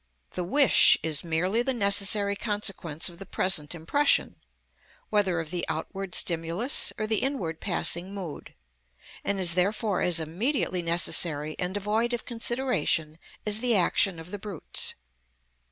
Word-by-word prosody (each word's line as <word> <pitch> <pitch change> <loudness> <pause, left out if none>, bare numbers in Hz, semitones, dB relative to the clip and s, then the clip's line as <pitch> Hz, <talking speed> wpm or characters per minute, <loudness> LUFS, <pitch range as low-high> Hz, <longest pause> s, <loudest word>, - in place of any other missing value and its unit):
The 180 - -4
wish 275 +10 +6
is 155 -3 +1
merely 175 +7 0
the 265 +1 -1
necessary 200 -1 +3
consequence 195 -7 -1
of 175 -1 -8
the 195 - -9
present 175 -4 -1
impression, 280 - +1 0.7
whether 195 -5 +1
of 160 -1 -6
the 175 -1 -2
outward 190 +3 -5
stimulus, 170 - +1
or 215 - -2
the 215 -1 +2
inward 195 - -3
passing 180 -1 0
mood; 190 -6 -8 0.7
and 200 -1 -1
is 175 -2 +4
therefore 200 +2 0
as 175 -2 +3
immediately 180 - -2
necessary 165 -2 +1
and 180 0 -2
devoid 215 +4 -1
of 235 - -9
consideration 225 - -1 0.3
as 210 0 +1
the 245 -1 +3
action 185 0 +2
of 165 +2 -11
the 205 - -6
brutes. 195 -5 -1
190 Hz, 140 wpm, -26 LUFS, 170-215 Hz, 0.7 s, wish